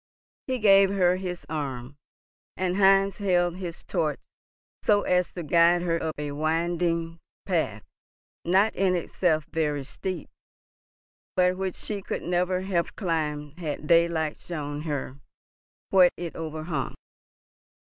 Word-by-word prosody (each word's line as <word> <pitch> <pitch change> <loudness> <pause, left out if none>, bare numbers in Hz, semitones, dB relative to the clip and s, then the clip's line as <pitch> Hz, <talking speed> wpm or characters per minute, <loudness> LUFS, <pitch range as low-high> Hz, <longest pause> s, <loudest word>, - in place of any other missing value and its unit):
He 260 -1 0
gave 195 -3 +6
her 185 -2 +3
his 180 -2 -5
arm, 140 -4 -4 0.6
and 185 0 0
Heinz 195 -1 +4
held 175 -3 +1
his 175 -3 -7
torch 150 -3 -1 0.6
so 205 -1 +3
as 180 0 +1
to 175 - -5
guide 170 +3 +4
her 170 -1 0
up 160 -1 -2
a 145 -1 -4
winding 165 +2 -1 0.3
path, - - -1 0.6
not 190 +5 +3
in 185 -1 +2
itself 165 -2 0
very 150 -3 0
steep, 180 +5 -5 1.1
but 180 0 +3
which 190 -1 -3
she 205 -2 -5
could - - -4
never 180 +1 0
have 185 -3 -1
climbed 155 -4 -2
had 150 -3 -4
daylight 165 -1 +2
shown 145 -3 -5
her 145 -3 -4 0.7
what 185 -2 +7
it 170 -1 -5
overhung. 155 -2 -4
170 Hz, 125 wpm, -26 LUFS, 155-185 Hz, 1.1 s, what